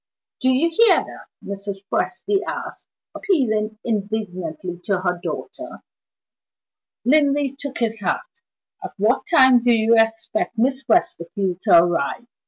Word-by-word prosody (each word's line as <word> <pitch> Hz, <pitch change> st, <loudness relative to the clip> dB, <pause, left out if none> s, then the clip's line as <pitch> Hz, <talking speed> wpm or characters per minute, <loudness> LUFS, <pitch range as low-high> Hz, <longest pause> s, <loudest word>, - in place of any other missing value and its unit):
"Do 260 Hz, -, +1 dB
you 280 Hz, +6 st, +2 dB
hear 460 Hz, +6 st, +5 dB
that?" -, -, -5 dB, 0.2 s
Mrs. 200 Hz, 0 st, -6 dB
Presty 395 Hz, -, -1 dB
asked, -, -, -6 dB, 0.3 s
appealing 220 Hz, -, 0 dB
indignantly 190 Hz, -5 st, -4 dB
to 195 Hz, -3 st, 0 dB
her 180 Hz, -1 st, -1 dB
daughter. -, -, -7 dB, 1.2 s
Linley 285 Hz, 0 st, +2 dB
took 280 Hz, -1 st, -7 dB
his 225 Hz, -2 st, -1 dB
hat. 185 Hz, -3 st, -1 dB, 0.6 s
"At -, -, -7 dB
what 215 Hz, +6 st, +1 dB
time 260 Hz, -7 st, +5 dB
do 245 Hz, -, +3 dB
you 225 Hz, 0 st, +3 dB
expect 225 Hz, +7 st, 0 dB
Miss 265 Hz, +3 st, 0 dB
Westerfield 190 Hz, -, 0 dB
to -, -, +7 dB
arrive?" 175 Hz, +5 st, -2 dB
225 Hz, 125 wpm, -21 LUFS, 195-270 Hz, 1.2 s, to